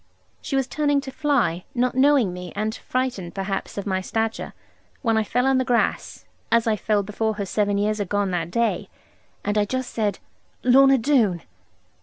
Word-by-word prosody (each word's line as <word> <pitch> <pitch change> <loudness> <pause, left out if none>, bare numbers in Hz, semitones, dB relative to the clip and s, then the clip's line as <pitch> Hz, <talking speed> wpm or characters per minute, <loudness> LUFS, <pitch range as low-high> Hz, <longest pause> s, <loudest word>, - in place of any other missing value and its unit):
She 275 - -3
was 270 -1 +2
turning 290 +1 +1
to 270 -1 -7
fly, 255 - 0
not 250 0 +1
knowing 260 -7 +3
me, 180 -1 -7
and 215 +2 -1
frightened, 245 -11 -3
perhaps, 195 +1 -3
at 200 - -3
my 190 -2 -1
stature, 225 +3 -2 0.5
when 225 -3 +2
I 220 - +2
fell 245 +5 0
on 265 -1 +3
the - - +2
grass 245 -2 -1 0.3
(as 230 -1 +4
I 220 -2 +2
fell 210 0 0
before 215 +2 -2
her 205 -1 -3
seven 205 +1 0
years 210 +1 0
agone 205 0 0
that 170 -2 -2
day), 235 +5 0 0.6
and 205 +1 +1
I 205 - +2
just 255 +4 -3
said, 210 -3 0 0.5
'Lorna 270 +2 +6
Doone!' 225 - +2
220 Hz, 180 wpm, -23 LUFS, 200-255 Hz, 0.6 s, Lorna